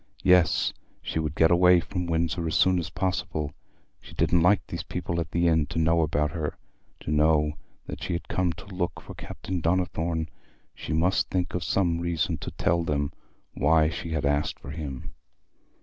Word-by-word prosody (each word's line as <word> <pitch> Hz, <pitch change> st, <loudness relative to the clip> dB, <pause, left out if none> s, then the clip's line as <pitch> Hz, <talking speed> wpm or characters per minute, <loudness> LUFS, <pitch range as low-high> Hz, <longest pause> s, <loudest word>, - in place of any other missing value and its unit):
Yes, 90 Hz, -3 st, +4 dB, 0.3 s
she -, -, -2 dB
would 75 Hz, -1 st, -2 dB
get 80 Hz, +1 st, +4 dB
away 90 Hz, 0 st, +6 dB
from 90 Hz, +1 st, -4 dB
Windsor 85 Hz, 0 st, 0 dB
as 80 Hz, -, -2 dB
soon 95 Hz, -1 st, +4 dB
as 80 Hz, -2 st, -4 dB
possible: 90 Hz, -4 st, -2 dB, 0.5 s
she -, -, -13 dB
didn't 85 Hz, 0 st, +3 dB
like 90 Hz, -1 st, +4 dB
these -, -, -5 dB
people 85 Hz, -, -3 dB
at 85 Hz, -, -3 dB
the 85 Hz, 0 st, +1 dB
inn 80 Hz, -3 st, +3 dB
to 80 Hz, -, -6 dB
know 80 Hz, +1 st, +3 dB
about 75 Hz, -1 st, +1 dB
her, 80 Hz, -3 st, -4 dB, 0.4 s
to -, -, -4 dB
know 75 Hz, 0 st, +3 dB, 0.3 s
that -, -, -7 dB
she -, -, -3 dB
had 85 Hz, -, -4 dB
come 90 Hz, -2 st, 0 dB
to -, -, -12 dB
look 90 Hz, -1 st, -2 dB
for -, -, -10 dB
Captain 95 Hz, -2 st, -5 dB
Donnithorne. 85 Hz, -1 st, 0 dB, 0.5 s
She -, -, -7 dB
must 85 Hz, +4 st, +2 dB
think 90 Hz, -1 st, -1 dB
of 90 Hz, -, -2 dB
some 85 Hz, -1 st, +1 dB
reason 85 Hz, -2 st, -1 dB
to -, -, -5 dB
tell 85 Hz, 0 st, 0 dB
them 70 Hz, -3 st, -1 dB, 0.4 s
why 80 Hz, +1 st, +3 dB
she 85 Hz, -, -5 dB
had 80 Hz, -3 st, -1 dB
asked 75 Hz, +1 st, 0 dB
for 70 Hz, -, -9 dB
him. 70 Hz, -4 st, -6 dB
85 Hz, 185 wpm, -26 LUFS, 75-90 Hz, 0.5 s, away